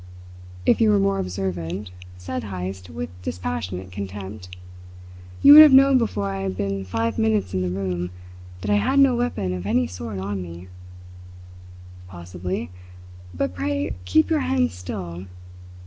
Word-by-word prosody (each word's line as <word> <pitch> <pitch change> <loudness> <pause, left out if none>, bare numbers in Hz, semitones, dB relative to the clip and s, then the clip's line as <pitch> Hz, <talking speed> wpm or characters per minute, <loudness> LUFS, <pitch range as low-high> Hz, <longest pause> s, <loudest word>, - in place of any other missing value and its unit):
"If - - +3
you 220 - +5
were 210 - +4
more 195 0 +1
observant," 90 0 -4 0.3
said 110 +7 -5
Heyst 95 -1 -6
with 80 +1 -6
dispassionate 90 +1 -4
contempt, 95 -1 -7 0.9
"you 285 - +10
would 305 - +12
have 300 -3 +8
known 270 0 +7
before 105 - -1
I 95 0 -4
had 95 -1 -3
been 100 -1 -2
five 115 +2 -2
minutes 105 -4 +1
in 95 - 0
the 90 - -1
room 90 -1 -3 0.5
that 100 - -2
I 105 - +4
had 105 - +1
no 275 -3 +5
weapon 105 - -1
of 90 +1 -5
any 120 +4 +2
sort 105 +1 -6
on 95 0 -3
me." 85 +1 -9 1.4
"Possibly; 90 -1 -6 0.6
but 90 0 -2
pray 95 +1 -2
keep 95 - +2
your 315 - +3
hands 260 -2 0
still. 90 0 -7
95 Hz, 150 wpm, -23 LUFS, 90-110 Hz, 1.4 s, would